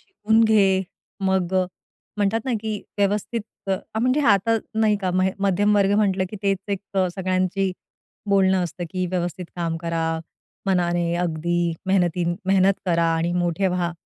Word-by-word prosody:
शिकून 220 - +1
घे. 195 -4 +4 0.4
मग 190 -1 0 0.6
म्हणतात 210 +2 +1
ना 260 - -1
की 215 -2 -3 0.2
व्यवस्थित 205 +3 0 0.3
अ, 190 - +3 0.3
म्हणजे 255 +5 +2
आता 215 +2 +4 0.2
नाही 220 -1 +3
का 185 -2 0
म 185 - +3 0.2
मध्यमवर्ग 200 +1 +3
म्हटलं, 195 -3 +2
की 210 - -6
तेच 195 -1 +1
एक 195 - -2 0.3
सगळ्यांची 185 0 0 0.6
बोलणं 190 -2 +3
असतं 175 +1 -5
की 185 -1 -2
व्यवस्थित 180 0 -2
काम 165 -1 -1
करा, 165 0 -2 0.6
मनाने 175 -2 +1
अगदी 175 0 0
मेहनती 180 -2 +2 0.2
मेहनत 190 0 +4
करा 170 -1 +2
आणि 170 +1 0
मोठे 175 +1 0
व्हा. 175 -1 -1
190 Hz, 140 wpm, -23 LUFS, 175-200 Hz, 0.6 s, घे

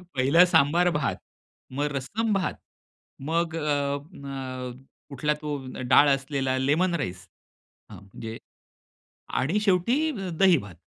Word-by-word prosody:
पहिलं 140 +7 +5
सांबार 175 +2 +3
भात 150 -3 -1 0.6
मग 145 +2 -1
रसम 215 - -2
भात 190 -2 0 0.8
मग 165 0 0
अ, - - -3 0.7
अ, 130 -2 -5 0.4
कुठला 150 +2 0
तो 150 -1 -3 0.3
डाळ 145 +2 +7
असलेला 135 -1 0
लेमन 160 +7 +2
राईस 95 - -4 0.6
हं - - -9
म्हणजे 110 +3 -8 1.0
आणि 165 +11 +1
शेवटी 230 - +2 0.3
दही-भात. 155 - +3
145 Hz, 110 wpm, -26 LUFS, 130-175 Hz, 1.0 s, डाळ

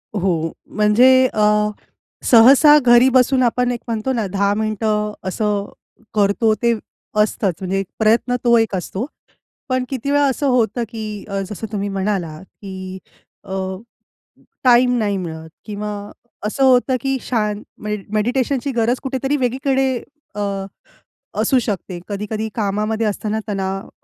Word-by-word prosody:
हो. 170 -5 0 0.2
म्हणजे 215 +5 +5 0.2
अ, 210 0 +3 0.6
सहसा 270 +6 +8
घरी 240 +1 +7
बसून 255 0 +3
आपण 245 +1 +1
एक 240 - -3
म्हणतो 230 +3 -2
ना, 230 -4 -1
10 200 +1 +1
मिनिटं 215 -1 -1
असं 205 +1 -1 0.5
करतो, 210 +2 +2
ते 235 +1 +1 0.5
असतंच. 205 -3 0
म्हणजे 190 +1 -1
एक 195 - -2
प्रयत्न 230 +3 +2
तो 235 -1 +5
एक 225 -3 +1
असतो. 190 +4 -3 0.6
पण 255 0 +1
किती 270 +1 -3
वेळा 290 0 +3
असं 275 +1 0
होतं 235 -2 +1
की 225 -2 -6 0.3
अ, 195 0 -2
जसं 215 +1 -6
तुम्ही 205 -1 -2
म्हणालात, 190 -5 -2 0.2
की 190 -1 -7 0.5
अ, 200 - -11 1.1
टाईम 250 0 +5
नाही 205 -3 0
मिळत 160 -3 -6 0.2
किंवा 210 0 -4 0.5
असं 215 +6 0
होतं 255 0 +4
की 270 +1 0
शान 210 -3 -1 0.2
मे 210 0 -2 0.2
मेडिटेशनची 250 +5 0
गरज 240 0 +1
कुठेतरी 270 +1 -1
वेगळीकडे 265 +1 +1 0.4
अ, 205 - -3 1.0
असू 265 - +3
शकते. 195 -5 -4
कधी-कधी 210 +2 -3
कामामध्ये 215 +1 -1
असताना 210 +1 -2
तणाव 195 -1 -3
220 Hz, 135 wpm, -19 LUFS, 200-250 Hz, 1.1 s, सहसा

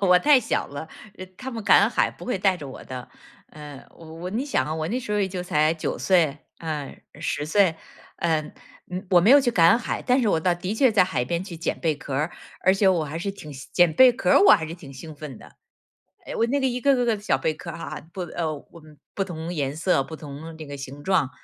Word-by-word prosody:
我 180 -2 +5
太 290 0 +5
小 - - -1
了， 145 +3 -7 0.3
呃 185 - -7
他 260 +4 -6
们 230 -3 -6
赶 200 0 +6
海 - - +1
不 - - -12
会 245 -6 -2
带 190 -1 +2
着 145 - -8
我 130 - -9
的。 130 -1 -8 0.4
呃， 150 -3 -11
我 165 +2 -8
你 235 +6 -2
想 285 - 0
啊， 155 - -3
我 155 0 -3
那 245 +6 -1
时 210 -4 -5
候 210 - +1
也 190 - +1
就 180 -1 -4
才 155 -2 +2
9 160 - -3
岁， 165 -6 +2 0.2
嗯， 155 -4 -5 0.2
10 145 -2 -2
岁， 185 0 +3 0.4
嗯。 160 -3 -1 0.4
嗯， 180 +2 -5
我 175 -2 +6
没 210 +8 +4
有 285 +1 +8
去 250 - +1
赶 195 +1 +5
海， 235 - -3
但 255 +1 +2
是 220 - +2
我 165 - +2
倒 175 +2 +1
的 180 +3 -4
确 240 +1 +3
在 205 - +5
海 130 -9 -1
边 170 +5 -2
去 180 -3 -8
捡 165 - -2
贝 160 -3 +1
壳 140 -2 -6
儿， 150 +5 0 0.3
而 190 - +4
且 195 0 +2
我 170 -4 +2
还 155 +3 -5
是 195 +3 -3
挺 155 -7 -10
兴 130 - -10
捡 175 -2 +4
贝 250 +8 +7
壳 195 -7 -1
儿， - - +6
我 205 - +8
还 160 - +4
是 160 +2 -6
挺 140 -5 -12
兴 155 +4 -9
奋 145 -5 -8
的。 - - -16 0.7
哎， - - -5
我 230 - +2
那 280 +2 +1
个， 265 - +1
一 250 -1 -1
个 275 +2 +3
个 245 -2 0
个 225 -2 +2
的 205 - -13
小 - - +1
贝 155 - -1
壳 170 +1 -8
哈 165 - -7
哈， 150 -1 -7
不， 190 - -7
呃， 170 -1 -3
不 170 -2 -17 0.3
不 195 - -1
同 170 -1 -6
颜 140 -2 -2
色， 160 -4 +1
不 160 - -9
同 155 +2 -9
那 155 - -8
个 140 0 -7
形 135 +1 -9
状。 185 -8 +1
170 Hz, 270 characters per minute, -24 LUFS, 155-200 Hz, 0.7 s, 有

